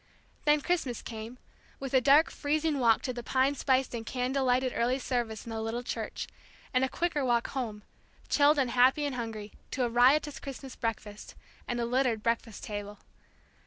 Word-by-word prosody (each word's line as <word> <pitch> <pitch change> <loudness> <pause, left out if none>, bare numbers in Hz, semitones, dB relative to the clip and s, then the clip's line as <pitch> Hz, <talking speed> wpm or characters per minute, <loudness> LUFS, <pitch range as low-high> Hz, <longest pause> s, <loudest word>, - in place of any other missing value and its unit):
Then 295 0 +4
Christmas 285 -8 -1
came, 225 +2 -7 0.4
with 270 -1 -5
a 260 - +5
dark, 285 +5 +5
freezing 300 0 0
walk 230 -3 +4
to 255 - -2
the 240 - -5
pine 260 +3 +2
spiced 265 -2 +1
and 230 -1 -4
candle 260 +3 -1
lighted 255 0 +2
early 245 +3 +1
service 240 -5 -2
in 230 - -7
the 225 0 -3
little 225 +2 -3
church, - - -4 0.5
and 255 0 +3
a 265 - +1
quicker 335 -3 -1
walk 240 -2 +1
home, 220 -6 -4 0.4
chilled 295 +1 +4
and 260 -4 +1
happy 260 +4 +4
and 285 - -2
hungry, 220 -4 -5 0.2
to 260 - -1
a 240 - +1
riotous 265 +5 +4
Christmas 270 -1 -8
breakfast, 215 -3 -5 0.3
and 240 -1 -2
a 235 - 0
littered 245 -3 +1
breakfast 230 -2 -2
table. 205 0 -5
250 Hz, 180 wpm, -30 LUFS, 230-275 Hz, 0.5 s, a